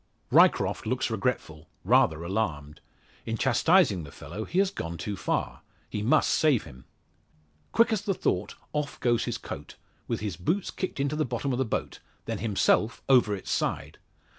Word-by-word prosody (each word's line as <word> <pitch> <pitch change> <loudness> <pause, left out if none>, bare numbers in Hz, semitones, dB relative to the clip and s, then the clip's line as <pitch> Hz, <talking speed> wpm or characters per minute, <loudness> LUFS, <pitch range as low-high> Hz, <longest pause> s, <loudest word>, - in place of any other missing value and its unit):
Ryecroft - - +4
looks - - -1
regretful 80 +1 -2
rather 115 -7 +3
alarmed. 80 -7 -3 0.5
In 115 0 -1
chastising 130 - +3
the 70 - -10
fellow 110 +8 -7
he 175 - -4
had 195 0 +3
gone 85 - -5
too 105 +3 -4
far. - - -2 0.3
He 105 - -2
must 130 +9 +3
save 145 -8 +3
him! 65 -5 -13 0.9
Quick 230 0 +4
as 210 - 0
the 200 -2 -1
thought 95 - -1 0.2
off 150 -1 -3
goes 120 -2 +1
his - - -2
coat, - - -8 0.3
with - - -2
his 100 -6 -4
boots 175 - -1
kicked 185 - -4
into 140 +2 0
the 155 - +1
bottom 125 +1 -2
of 125 - -1
the 130 - +2
boat; 110 - -3 0.3
then - - -3
himself 110 +1 +1
over 125 -6 +4
its 95 - -7
side! - - -2
115 Hz, 170 wpm, -27 LUFS, 95-150 Hz, 0.9 s, Ryecroft